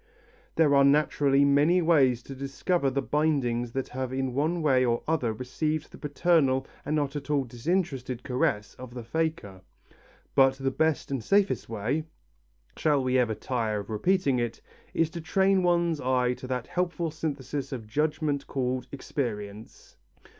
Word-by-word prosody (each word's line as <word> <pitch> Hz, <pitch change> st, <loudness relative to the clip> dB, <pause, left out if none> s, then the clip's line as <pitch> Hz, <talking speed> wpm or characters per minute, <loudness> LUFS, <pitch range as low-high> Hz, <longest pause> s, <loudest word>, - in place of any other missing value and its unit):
There 155 Hz, -3 st, +4 dB
are 140 Hz, 0 st, +6 dB
naturally 140 Hz, -1 st, +3 dB
many 145 Hz, +6 st, +4 dB
ways 140 Hz, -8 st, +3 dB
to 135 Hz, -, -8 dB
discover 140 Hz, +3 st, -1 dB
the 135 Hz, +1 st, -1 dB
bindings 130 Hz, -6 st, 0 dB
that 135 Hz, -1 st, -3 dB
have 130 Hz, 0 st, -4 dB
in 130 Hz, -1 st, -2 dB
one 160 Hz, +5 st, 0 dB
way 130 Hz, -4 st, +4 dB
or 120 Hz, -1 st, 0 dB
other 150 Hz, -8 st, +1 dB
received 145 Hz, +7 st, -3 dB
the -, -, -12 dB
paternal 145 Hz, -3 st, +2 dB, 0.2 s
and 150 Hz, -, -1 dB
not 145 Hz, -1 st, -1 dB
at 145 Hz, 0 st, -6 dB
all 145 Hz, -2 st, +2 dB
disinterested 130 Hz, -1 st, -2 dB
caress 105 Hz, -5 st, -1 dB
of 125 Hz, -1 st, -9 dB
the 120 Hz, -, -6 dB
faker, 115 Hz, -, -3 dB, 0.7 s
but 135 Hz, 0 st, +5 dB
the 135 Hz, 0 st, -1 dB
best 160 Hz, 0 st, 0 dB
and 135 Hz, -5 st, -2 dB
safest 200 Hz, -, +1 dB
way 115 Hz, +8 st, -1 dB, 0.7 s
shall 145 Hz, -4 st, +2 dB
we 130 Hz, 0 st, +2 dB
ever 115 Hz, -3 st, +1 dB
tire 110 Hz, -3 st, -2 dB
of 100 Hz, -, -10 dB
repeating 140 Hz, -, +1 dB
it 120 Hz, -1 st, -3 dB, 0.3 s
is 165 Hz, -1 st, +1 dB
to 170 Hz, -, -6 dB
train 190 Hz, +3 st, +2 dB
one's 170 Hz, -3 st, +1 dB
eye 125 Hz, -1 st, +1 dB
to 130 Hz, -, -9 dB
that 125 Hz, -2 st, -2 dB
helpful 175 Hz, -2 st, -2 dB
synthesis 145 Hz, -3 st, -4 dB
of 120 Hz, -5 st, -5 dB
judgment 150 Hz, +4 st, -1 dB
called 130 Hz, -1 st, -2 dB
experience. 110 Hz, -7 st, -6 dB
135 Hz, 160 wpm, -27 LUFS, 125-155 Hz, 0.7 s, are